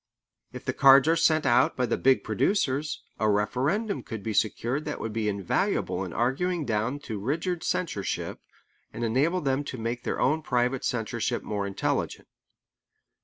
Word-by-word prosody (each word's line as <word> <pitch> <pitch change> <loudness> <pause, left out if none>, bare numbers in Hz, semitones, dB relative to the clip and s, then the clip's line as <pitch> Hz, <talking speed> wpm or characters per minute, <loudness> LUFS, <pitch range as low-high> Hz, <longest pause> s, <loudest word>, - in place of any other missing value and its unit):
If - - -9
the - - -1
cards 135 0 +7
are 165 - +4
sent 160 -2 +3
out 125 0 +3
by 125 - +2
the 115 - 0
big 135 0 +3
producers, 150 -7 0 0.2
a 110 - +2
referendum 135 - 0
could 110 -4 -7
be 110 - -2
secured 120 +7 0
that 150 - -4
would 115 - -4
be 110 -1 0
invaluable 100 -3 -1
in - - -6
arguing 155 +8 0
down 115 +4 -1
to 110 -7 -5
rigid 165 - -2
censorship, 130 - -2 0.5
and 120 - -5
enable 145 +11 +1
them 135 0 0
to 130 - -5
make 115 +1 -3
their - - -2
own 155 +4 +2
private 125 -2 0
censorship 115 -1 -2
more 100 -1 -2
intelligent. 100 - -2
130 Hz, 165 wpm, -27 LUFS, 110-150 Hz, 0.5 s, cards